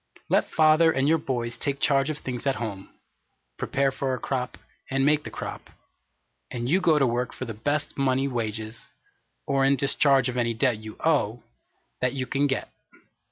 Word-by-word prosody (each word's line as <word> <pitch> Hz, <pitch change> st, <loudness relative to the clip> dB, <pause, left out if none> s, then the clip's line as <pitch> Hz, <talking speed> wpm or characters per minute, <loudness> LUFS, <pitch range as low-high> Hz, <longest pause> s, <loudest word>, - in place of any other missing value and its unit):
Let -, -, +2 dB
father 160 Hz, +1 st, +5 dB
and 135 Hz, -2 st, +1 dB
your 160 Hz, +1 st, +4 dB
boys 120 Hz, -3 st, -3 dB
take 140 Hz, -1 st, -2 dB
charge 135 Hz, 0 st, +2 dB
of 155 Hz, -, -2 dB
things 125 Hz, -1 st, -5 dB
at 135 Hz, -, +2 dB
home 100 Hz, -5 st, -5 dB, 0.7 s
prepare 135 Hz, 0 st, +1 dB
for 135 Hz, -1 st, -2 dB
a -, -, -5 dB
crop, 125 Hz, -2 st, -3 dB, 0.3 s
and 135 Hz, 0 st, +1 dB
make 150 Hz, 0 st, +3 dB
the -, -, -6 dB
crop; -, -, -7 dB, 0.8 s
and 120 Hz, 0 st, -4 dB
you 180 Hz, +8 st, +3 dB
go 165 Hz, -4 st, +4 dB
to 140 Hz, -, +4 dB
work 120 Hz, +1 st, -1 dB
for 130 Hz, -, -6 dB
the 115 Hz, -, -5 dB
best 145 Hz, +7 st, -2 dB
money 135 Hz, 0 st, +2 dB
wages, 110 Hz, -3 st, -4 dB, 0.6 s
or 135 Hz, -1 st, +1 dB
in 135 Hz, +1 st, +4 dB
discharge 135 Hz, -1 st, +3 dB
of 125 Hz, 0 st, -3 dB
any 115 Hz, -1 st, 0 dB
debt 125 Hz, -1 st, +2 dB
you 110 Hz, 0 st, -9 dB
owe, 120 Hz, -8 st, +1 dB, 0.6 s
that 125 Hz, +1 st, +1 dB
you 130 Hz, -2 st, -2 dB
can 140 Hz, +2 st, +1 dB
get. 135 Hz, -2 st, -3 dB
135 Hz, 185 wpm, -26 LUFS, 120-140 Hz, 0.8 s, father